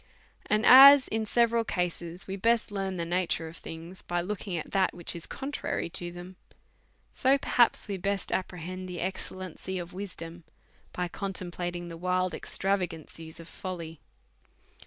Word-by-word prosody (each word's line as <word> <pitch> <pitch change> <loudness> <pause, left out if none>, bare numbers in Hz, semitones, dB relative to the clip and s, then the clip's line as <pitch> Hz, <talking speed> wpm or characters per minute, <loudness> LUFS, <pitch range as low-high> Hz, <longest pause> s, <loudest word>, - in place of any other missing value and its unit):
And 215 +2 +2
as 275 +1 +10
in 220 0 -1
several 235 0 +3
cases 175 -3 -3
we 190 - -4
best 230 +3 +2
]earn 195 -2 -2
the 170 - -2
nature 170 -1 -1
of 160 +1 -10
things 165 +3 -9
by 175 0 -2
looking 185 0 -3
at 160 - -6
that 190 -2 +2
which 175 -1 -4
is 170 - -6
contrary 270 -10 -3
to 175 0 -2
them^ 175 +1 -9 0.8
so 270 +1 +4
perhaps 245 -3 +2
we 200 -2 -3
best 195 +1 -2
com - - +2
prehend 185 +1 -7
the 180 -1 -6
excellency 185 0 -4
of 175 -1 -6
wisdom 175 -3 -7 0.5
by 180 0 -2
contemplating 175 -2 -4
the 165 -1 -8
wild 180 0 0
extravagances 165 -5 -3
of 165 - -10
folly. 170 -5 -7
185 Hz, 155 wpm, -29 LUFS, 175-200 Hz, 0.8 s, as